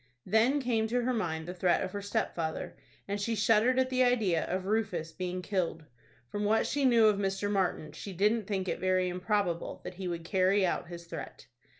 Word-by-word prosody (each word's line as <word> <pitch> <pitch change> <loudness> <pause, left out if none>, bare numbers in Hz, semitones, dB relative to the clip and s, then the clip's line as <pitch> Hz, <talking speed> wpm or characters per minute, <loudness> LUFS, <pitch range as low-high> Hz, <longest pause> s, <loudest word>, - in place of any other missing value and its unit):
Then 225 +8 +3
came 230 -4 0
to 245 +2 0
her 255 +1 +1
mind 160 -7 -2
the 180 - -4
threat 180 -1 +2
of 185 - -4
her 205 - -4
stepfather, 165 -5 -2 0.3
and 200 +1 -2
she 225 +2 0
shuddered 225 +4 +3
at 260 0 +2
the 255 0 +2
idea 220 -10 +2
of 185 +1 -3
Rufus 190 -6 -1
being 180 +1 -4
killed. 175 -5 -2 0.5
From 205 - -2
what 215 +2 +3
she 285 -1 0
knew 235 -3 +5
of 210 -2 +4
Mr. 195 +1 -1
Martin, 185 -6 0
she 180 +6 -8
didn't 210 +3 +1
think 190 -2 -2
it - - -2
very 185 0 +1
improbable 180 -1 -1
that - - -6
he 185 0 -5
would 170 -2 -4
carry 190 +1 +3
out 175 - -1
his 170 0 -9
threat. 170 - -8
195 Hz, 205 wpm, -30 LUFS, 180-220 Hz, 0.5 s, knew